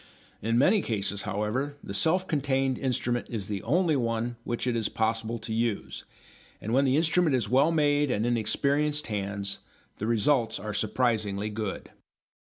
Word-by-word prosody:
In 115 +2 +1
many 190 - +4
cases, 100 - -2
however, 125 +8 -2
the - - -6
self 175 - +2
contained 135 -3 0
instrument 120 -2 -1
is 105 -5 -4
the 100 -2 -3
only 170 -1 +2
one 115 -1 -1
which 120 +1 -3
it 125 -2 0
is 110 -2 0
possible 110 +1 -1
to 110 - -6
use, 115 -2 -2 0.5
and 110 - -4
when 135 +2 +4
the 135 +1 +3
instrument 160 -2 +3
is 115 -5 -1
well 140 +7 +4
made 145 -2 +2
and 110 -2 0
in 120 0 +2
experienced 145 +6 +1
hands 100 -1 -3 0.4
the 110 - -2
results 115 0 +2
are 105 0 -5
surprisingly 105 -2 0
good. 105 -2 -5
120 Hz, 165 wpm, -28 LUFS, 110-140 Hz, 0.5 s, many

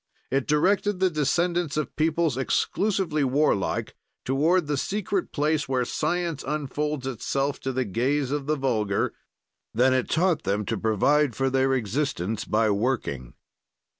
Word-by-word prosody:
It 135 0 0
directed 190 +6 +2
the 185 -1 +3
descendants 170 +2 0
of 155 - -3
peoples 160 -2 +1
exclusively 170 +4 0
warlike 135 -6 +1 0.3
toward 155 +7 +2
the 145 0 -1
secret 195 +5 -2
place 150 -1 0
where 130 -2 +1
science 165 +2 -2
unfolds 150 -1 -2
itself 135 +2 -2
to 135 - -3
the 130 0 -1
gaze 130 +7 0
of 145 -1 -2
the 155 - +2
vulgar; 110 -8 0 0.6
then 130 +3 +4
it 130 -1 0
taught 170 -1 +2
them 100 +1 -1
to - - -1
provide 125 +5 +2
for 135 0 0
their 135 0 +2
existence 115 -3 -2
by 110 0 +2
working. 100 - -2
140 Hz, 140 wpm, -25 LUFS, 125-155 Hz, 0.6 s, then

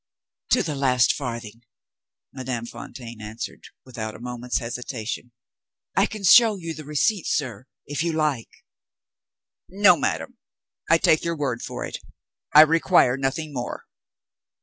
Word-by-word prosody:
"To - - +3
the 155 - -3
last 130 -3 +3
farthing!" 115 -4 -6 0.7
Madame 130 -3 -4
Fontaine 120 -1 -9
answered, 110 +2 -7 0.2
without 115 -4 -6
a - - -11
moment's 125 0 -3
hesitation. 120 0 -5 0.6
"I - - +4
can 215 -2 -8
show 220 +3 +7
you 165 -4 -6
the 155 - -9
receipts, 150 +6 0
sir, 130 -3 -5 0.2
if 145 +1 -3
you 170 - 0
like." 150 -7 -1 1.2
"No, 195 -1 +5
madam! 80 - -3 0.5
I 165 - +6
take 160 -1 +3
your 170 -1 -2
word 130 -5 -2
for - - -5
it - - -6 0.5
I 150 - +10
require 160 -4 +4
nothing 145 +3 -3
more. 125 -2 -5
135 Hz, 135 wpm, -24 LUFS, 120-160 Hz, 1.2 s, I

